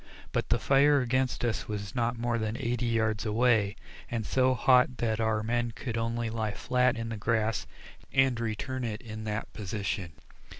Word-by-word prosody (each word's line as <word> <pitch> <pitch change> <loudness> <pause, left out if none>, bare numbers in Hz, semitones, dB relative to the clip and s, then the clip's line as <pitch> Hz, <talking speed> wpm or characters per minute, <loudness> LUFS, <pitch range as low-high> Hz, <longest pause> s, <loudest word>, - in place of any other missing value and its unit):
But - - -1
the - - +3
fire 140 +1 +4
against 130 0 0
us 115 -2 -1
was 100 -2 -4
not 120 -1 0
more 120 0 0
than 110 +1 -2
eighty 120 0 -1
yards 110 -2 +1
away, 110 -2 +2 0.3
and 115 -2 -2
so 130 +2 +3
hot 125 0 +4
that 110 -2 0
our 110 -1 +1
men 120 +1 -1
could 120 -4 -4
only 115 0 -1
lie 110 -2 -2
flat 125 0 +2
in 115 0 -4
the 115 - -4
grass 110 -2 0 0.4
and 130 -3 +3
return 115 +3 -3
it 110 -3 -3
in 110 -1 -7
that 105 +1 -4
position. 100 -4 -3
115 Hz, 175 wpm, -29 LUFS, 110-125 Hz, 0.4 s, fire